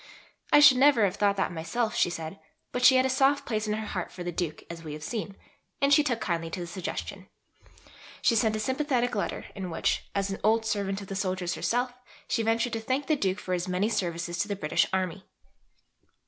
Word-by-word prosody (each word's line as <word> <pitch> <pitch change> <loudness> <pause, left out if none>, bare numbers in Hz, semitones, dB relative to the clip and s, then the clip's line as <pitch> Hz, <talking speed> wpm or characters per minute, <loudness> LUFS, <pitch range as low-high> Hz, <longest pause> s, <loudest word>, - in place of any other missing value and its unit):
"I - - +8
should 285 -4 +8
never 265 -5 +5
have 190 - -2
thought 200 -1 +2
that 190 - 0
myself," 215 +8 -2
she 175 - +3
said; 165 +2 -6 0.3
but 250 - -2
she 260 - +8
had 255 0 +4
a - - +3
soft 270 +2 +2
place 215 -2 -2
in 210 - 0
her 220 0 -3
heart 185 -4 -4
for 180 - -7
the 175 - -3
Duke, 165 -2 -3
as 170 -1 -8
we 155 -2 -6
have 150 0 -8
seen, 200 +1 -4 0.4
and 280 -1 +4
she 300 - +6
took 245 -5 -1
kindly 165 -4 -2
to 170 - -5
the 175 - -4
suggestion. 175 +1 -6 0.9
She 230 - +3
sent 220 0 +2
a - - -2
sympathetic 260 0 0
letter 205 - -2
in 190 -2 -5
which, 165 - -1
as 200 0 0
an 195 - -4
old 220 +1 +3
servant 200 -2 -1
of 200 - -9
the 195 - -5
soldiers 185 -2 -1
herself, 245 +1 -1 0.3
she - - 0
ventured 230 +2 +1
to 225 - -1
thank 260 +5 -1
the 310 - +2
Duke 195 -8 0
for 185 -3 -4
his 180 +1 -1
many 185 +4 0
services 175 -4 -2
to 205 - 0
the 205 - -2
British 155 -6 +1
Army. 185 0 -2
205 Hz, 225 wpm, -28 LUFS, 180-240 Hz, 0.9 s, I